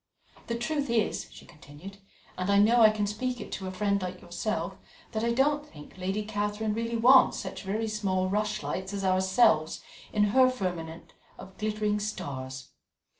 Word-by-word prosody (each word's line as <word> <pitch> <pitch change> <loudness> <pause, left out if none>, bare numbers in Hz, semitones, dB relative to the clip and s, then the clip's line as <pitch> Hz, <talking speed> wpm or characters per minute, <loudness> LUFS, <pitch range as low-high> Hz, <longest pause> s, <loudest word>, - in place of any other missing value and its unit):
"The 235 - -1
truth 280 +3 -2
is," 230 -2 0
she - - -13
continued, 150 +7 -12 0.4
"and 185 +1 -3
I 200 - +4
know 225 +4 +5
I 220 - +9
can 215 -1 -1
speak 245 +4 -3
it - - -8
to 190 - -4
a - - -4
friend 200 +1 0
like 185 0 -5
yourself, 175 +5 -3 0.4
that 220 -1 -2
I 235 - +1
don't 290 +4 +2
think 150 - -14
Lady 190 +3 -2
Catherine 210 0 -2
really 230 +1 -2
wants 255 +3 +6
such - - -6
very 215 +3 -2
small 195 -3 0
rushlights 205 -1 -2
as 200 -1 -3
ourselves 185 -3 +3 0.3
in 210 - +2
her 260 -1 +6
firmament 175 -8 -5 0.2
of 190 - -12
glittering 210 -1 0
stars. 130 -10 -5
210 Hz, 170 wpm, -28 LUFS, 185-225 Hz, 0.4 s, I